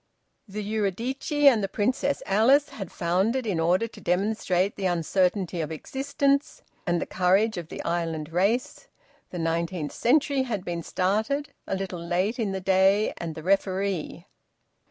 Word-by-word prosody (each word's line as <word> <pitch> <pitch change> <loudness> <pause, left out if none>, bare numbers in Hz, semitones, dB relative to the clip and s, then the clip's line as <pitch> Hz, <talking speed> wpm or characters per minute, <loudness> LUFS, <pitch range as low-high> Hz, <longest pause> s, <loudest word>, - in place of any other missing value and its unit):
The 210 +1 -5
"Eurydice" 220 - -2 0.2
and 230 -7 +6
the - - +1
"Princess 255 +8 0
Alice" 255 +9 +4
had 195 -5 -7
foundered 195 +9 0
in 195 -6 -1
order 180 +7 +2
to - - -14
demonstrate 190 0 0
the 190 - -1
uncertainty 180 +1 0
of 155 0 -4
existence 280 - -1 0.2
and 175 0 +2
the - - -2
courage 195 +5 +2
of 175 -3 -5
the - - -7
island 165 -2 -2
race. 225 - 0 0.4
The 180 - -7
"Nineteenth 165 -1 -2
Century" 280 +2 +2
had 220 -8 -3
been 170 -1 -3
started, 215 - -1
a - - -1
little 190 -3 -5
late 185 +7 0
in 215 -4 0
the 190 - -2
day, 195 +2 +3
and 165 -2 -5
the 160 - -8
"Referee." 190 -2 -1
195 Hz, 155 wpm, -26 LUFS, 175-225 Hz, 0.4 s, and